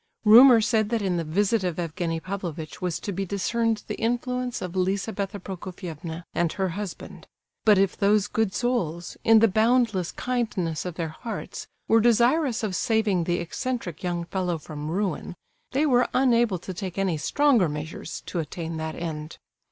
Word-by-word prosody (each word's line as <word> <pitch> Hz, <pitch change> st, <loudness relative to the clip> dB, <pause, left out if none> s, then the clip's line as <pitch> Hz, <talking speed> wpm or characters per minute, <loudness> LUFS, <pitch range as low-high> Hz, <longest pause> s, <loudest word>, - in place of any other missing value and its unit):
Rumour 235 Hz, +2 st, +9 dB
said 215 Hz, -1 st, +1 dB
that 230 Hz, -2 st, 0 dB
in 185 Hz, -3 st, 0 dB
the 170 Hz, -, -1 dB
visit 200 Hz, +6 st, +1 dB
of 180 Hz, -3 st, -2 dB
Evgenie 170 Hz, -1 st, -2 dB
Pavlovitch 170 Hz, -4 st, -6 dB
was 180 Hz, -3 st, -1 dB
to 205 Hz, -, -4 dB
be 195 Hz, +1 st, -2 dB
discerned 220 Hz, +3 st, -1 dB
the -, -, -4 dB
influence 245 Hz, +1 st, -1 dB
of 180 Hz, 0 st, -6 dB
Lizabetha 200 Hz, +2 st, -1 dB
Prokofievna 175 Hz, -3 st, -7 dB
and 170 Hz, -2 st, 0 dB
her 190 Hz, -2 st, -1 dB
husband... 195 Hz, +1 st, -7 dB, 0.4 s
But 210 Hz, -2 st, +6 dB
if 195 Hz, -1 st, +2 dB
those 205 Hz, 0 st, +3 dB
good 215 Hz, -1 st, 0 dB
souls, 175 Hz, -9 st, -1 dB
in 225 Hz, 0 st, +6 dB
the 225 Hz, -, +7 dB
boundless 220 Hz, -3 st, +2 dB
kindness 210 Hz, -11 st, -2 dB
of 180 Hz, -3 st, -4 dB
their 165 Hz, -2 st, -3 dB
hearts, 225 Hz, +9 st, -7 dB, 0.2 s
were 225 Hz, 0 st, +5 dB
desirous 240 Hz, +3 st, +3 dB
of 200 Hz, -4 st, -1 dB
saving 210 Hz, -6 st, +1 dB
the 175 Hz, 0 st, 0 dB
eccentric 180 Hz, -, -4 dB
young 175 Hz, -2 st, -2 dB
fellow 180 Hz, -1 st, -2 dB
from 150 Hz, -1 st, -7 dB
ruin, 185 Hz, -1 st, -2 dB, 0.4 s
they 280 Hz, +3 st, +2 dB
were 250 Hz, -4 st, +3 dB
unable 240 Hz, -6 st, +3 dB
to 185 Hz, +2 st, -7 dB
take 185 Hz, 0 st, -6 dB
any 190 Hz, -4 st, +1 dB
stronger 245 Hz, -, +3 dB
measures 150 Hz, +2 st, -6 dB
to 175 Hz, -, -4 dB
attain 165 Hz, +1 st, -4 dB
that 160 Hz, 0 st, -4 dB
end. 155 Hz, -2 st, -5 dB
195 Hz, 165 wpm, -25 LUFS, 170-225 Hz, 0.4 s, Rumour